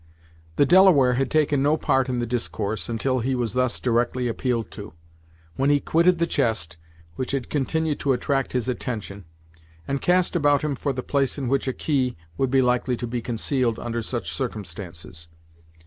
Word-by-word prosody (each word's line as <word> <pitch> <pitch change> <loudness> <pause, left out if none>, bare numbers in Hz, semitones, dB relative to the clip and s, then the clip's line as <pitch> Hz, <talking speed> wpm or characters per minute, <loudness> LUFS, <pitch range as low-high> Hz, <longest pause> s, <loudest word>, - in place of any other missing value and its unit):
The 145 - +4
Delaware 170 -8 +6
had 135 +2 0
taken 150 -3 +2
no 150 +3 +3
part 135 -3 +1
in 125 - -1
the 120 - -1
discourse 110 -4 -3
until 130 +3 0
he 130 +3 -1
was 120 -3 -2
thus 125 -1 0
directly 120 +1 0
appealed 120 -1 -2
to, 105 -4 -9 0.6
when 135 +1 +2
he 145 0 +4
quitted 170 +4 +3
the 170 - +2
chest, 85 - -1 0.4
which 130 - -3
had 135 -3 -3
continued 155 +2 0
to 140 - +1
attract 135 +2 -1
his 125 -1 -1
attention, 105 -6 -4 0.6
and 140 0 -2
cast 180 0 +2
about 145 -3 +3
him 150 -2 0
for 140 +2 -2
the 130 -1 -4
place 140 -2 0
in 135 -3 -3
which 135 +1 0
a - - +2
key 130 - -1 0.2
would 135 +8 0
be 135 0 +3
likely 125 0 +1
to 120 - -4
be 120 0 -3
concealed 120 0 -1
under 120 0 -3
such 120 +2 -4
circumstances. 90 - -6
125 Hz, 180 wpm, -24 LUFS, 115-140 Hz, 0.6 s, Delaware